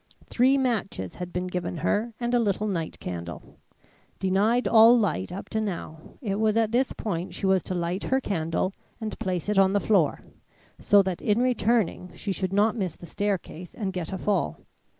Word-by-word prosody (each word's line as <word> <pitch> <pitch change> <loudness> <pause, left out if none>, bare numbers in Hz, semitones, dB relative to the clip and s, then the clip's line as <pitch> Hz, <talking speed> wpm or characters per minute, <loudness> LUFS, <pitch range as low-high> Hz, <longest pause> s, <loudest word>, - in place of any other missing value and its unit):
Three 260 +3 +3
matches 215 - -1
had 180 0 -5
been 180 +1 -2
given 180 -1 -3
her 225 +3 +1
and 240 0 -1
a 245 - +4
little 210 -2 0
night 170 -6 -3
candle. 85 -2 -7 0.6
Denied 205 +6 +2
all 230 +1 +7
light 195 - 0
up 190 +2 -6
to 220 - -1
now, 170 -6 -5 0.2
it 200 -2 -1
was 220 0 +2
at 225 -1 +2
this 255 +3 +2
point 180 -4 -4
she - - -3
was 190 -1 +3
to 185 - -4
light 175 +2 -2
her 265 - +2
candle 175 -4 -1 0.3
and 220 -1 -5
place 185 -6 -2
it 210 -1 +2
on 190 0 +4
the 205 - +3
floor, 195 -8 +2 0.6
so 200 -1 +5
that 185 -2 -3
in 210 +2 +2
returning 230 -7 +1
she 200 - -4
should 185 0 -2
not 205 +2 +3
miss 190 -7 -2
the - - -12
staircase 185 -3 -3
and 195 -3 -3
get 180 -2 -4
a 190 - -3
fall. 205 +2 -1
195 Hz, 190 wpm, -26 LUFS, 180-220 Hz, 0.6 s, all